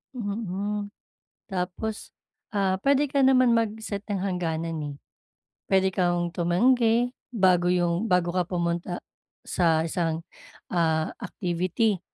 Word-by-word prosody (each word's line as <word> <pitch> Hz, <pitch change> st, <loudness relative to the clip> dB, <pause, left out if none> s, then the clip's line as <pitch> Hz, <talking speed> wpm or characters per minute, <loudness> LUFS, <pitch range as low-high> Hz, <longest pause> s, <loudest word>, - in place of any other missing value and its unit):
Mm. 205 Hz, -2 st, -3 dB, 0.5 s
Tapos, 190 Hz, +3 st, -4 dB, 0.4 s
ah, 195 Hz, -2 st, 0 dB
puwede 280 Hz, +3 st, +3 dB
ka 280 Hz, 0 st, +1 dB
naman 255 Hz, -2 st, +5 dB
mag-set 220 Hz, -2 st, -1 dB
ng 205 Hz, -, 0 dB
hangganan 165 Hz, -4 st, -2 dB
eh. 145 Hz, -1 st, -5 dB, 0.7 s
Puwede 190 Hz, 0 st, +3 dB
kang 175 Hz, -2 st, 0 dB
tumanggi, 230 Hz, +7 st, +3 dB, 0.2 s
bago 185 Hz, -6 st, +3 dB
'yong 175 Hz, +3 st, +1 dB
bago 180 Hz, -2 st, +2 dB
ka 180 Hz, -1 st, 0 dB
pumunta 175 Hz, 0 st, -1 dB, 0.5 s
sa 165 Hz, -3 st, +2 dB
isang, 165 Hz, -1 st, -1 dB, 0.5 s
ah, 160 Hz, -3 st, +1 dB
activity, 185 Hz, +3 st, -1 dB
185 Hz, 110 wpm, -26 LUFS, 175-220 Hz, 0.7 s, naman